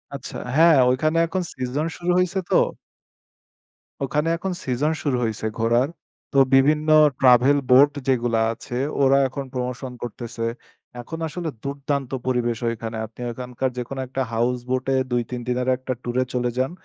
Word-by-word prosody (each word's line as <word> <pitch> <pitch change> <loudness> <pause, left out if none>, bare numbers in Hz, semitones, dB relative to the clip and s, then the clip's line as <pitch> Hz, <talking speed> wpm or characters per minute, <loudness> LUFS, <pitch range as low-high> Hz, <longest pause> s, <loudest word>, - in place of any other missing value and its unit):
আচ্ছা। - - -6 0.2
হ্যাঁ, 165 0 +6
ঐখানে 155 +5 +1
এখন 185 +3 -2
সিজন 130 +3 -2
শুরু 175 0 -1
হইছে 180 +1 +1
তো। - - +2 1.5
ওখানে 150 +3 -1
এখন 190 +2 -3
সিজন 135 +4 0
শুরু 135 -4 +1
হইছে 110 -1 -2
ঘোরার। 120 +5 +2 0.4
তো 140 - +1 0.2
বিভিন্ন 150 +3 +4 0.3
ট্রাভেল 130 +2 +5
বোট 140 +3 +7 0.2
যেগুলা 120 -3 +2
আছে, 120 - -7 0.3
ওরা 135 +1 +5
এখন 135 +1 -6
প্রমোশন 125 +1 -4
করতেছে। 115 -1 -5 0.6
এখন 160 +7 -7
আসলে 165 +1 -4
দুর্দান্ত 140 -1 -3 0.2
পরিবেশ 120 -2 0
ওইখানে। 115 0 -5
আপনি 110 +2 -17
ওইখানকার 125 +2 -3
যেকোনো 125 +2 -5
একটা 135 +1 -3
হাউস 120 +2 +1
বোট 130 0 0
এ - - +3
২ 120 0 +2
৩ 125 -1 -4
দিনের 125 +1 -1
একটা 130 0 -4
টুরে 125 +1 0
চলে 125 -1 0
যান। 130 +3 0
130 Hz, 155 wpm, -23 LUFS, 120-145 Hz, 1.5 s, বোট